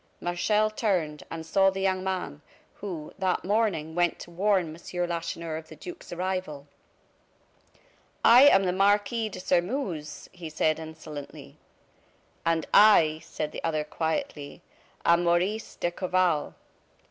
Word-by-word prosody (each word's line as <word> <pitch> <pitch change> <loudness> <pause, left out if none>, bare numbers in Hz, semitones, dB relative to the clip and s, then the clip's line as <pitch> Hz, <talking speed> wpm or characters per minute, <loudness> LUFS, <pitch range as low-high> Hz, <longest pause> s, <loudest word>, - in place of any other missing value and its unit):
Martial 210 +5 +1
turned, 180 -9 -1
and 160 -1 -6
saw 195 +3 +4
the 195 0 -4
young 190 -1 0
man, 180 -6 -3 0.4
who, 175 -7 -6
that 185 -2 0
morning, 200 -7 0
went 175 0 +1
to 175 - -11
warn 185 -1 +1
M. 175 +1 -4
Lacheneur 170 -1 -4
of 160 0 -9
the - - -12
duke's 355 -1 -10
arrival. 180 -5 -3 1.6
"I 250 +5 +9
am 195 -8 +6
the 180 -1 0
Marquis 205 +4 +2
de 185 - -8
Sairmeuse," 180 - -2
he 175 -3 -8
said, 155 0 +1
insolently. 155 -2 -9 0.9
"And 165 -1 +1
I," 165 -7 +6
said 150 -1 -5
the - - -7
other, 155 -2 0
quietly, 160 0 -4 0.4
"am 170 +1 +4
Maurice 180 +6 0
d'Escorval." 175 -2 0
175 Hz, 130 wpm, -27 LUFS, 160-195 Hz, 1.6 s, I